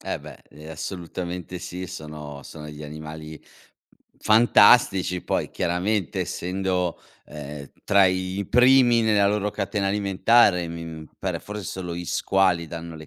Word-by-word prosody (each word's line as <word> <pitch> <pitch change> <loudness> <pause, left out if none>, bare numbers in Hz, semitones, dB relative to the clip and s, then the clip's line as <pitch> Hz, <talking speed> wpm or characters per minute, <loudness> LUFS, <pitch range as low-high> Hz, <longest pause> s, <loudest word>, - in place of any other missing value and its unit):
Eh, - - -4
beh, - - -13
ehm, 75 +2 -12
assolutamente 90 +2 -6
sì 90 +1 -6
sono 75 -5 -8
sono 75 +2 -10
degli 75 0 -9
animali 75 +1 -9 0.8
fantastici 105 -4 +4
poi, - - -2
chiaramente, 90 +2 -1
essendo, 90 -1 -2 0.3
ehm, 75 -1 -9
tra 100 -1 +5
i 95 +1 -2
primi 125 -1 +5
nella 105 -2 +3
loro 105 0 0
catena 100 -1 -2
alimentare, 100 -2 +3
mi, 85 0 -6
mhmm, 80 -1 -8
pare - - -3
for 105 +1 -7
solo 90 -1 -5
gli 90 +1 -5
squali 90 -2 +1
danno 85 0 -7
le 80 -1 -11
90 Hz, 140 wpm, -24 LUFS, 80-100 Hz, 0.8 s, tra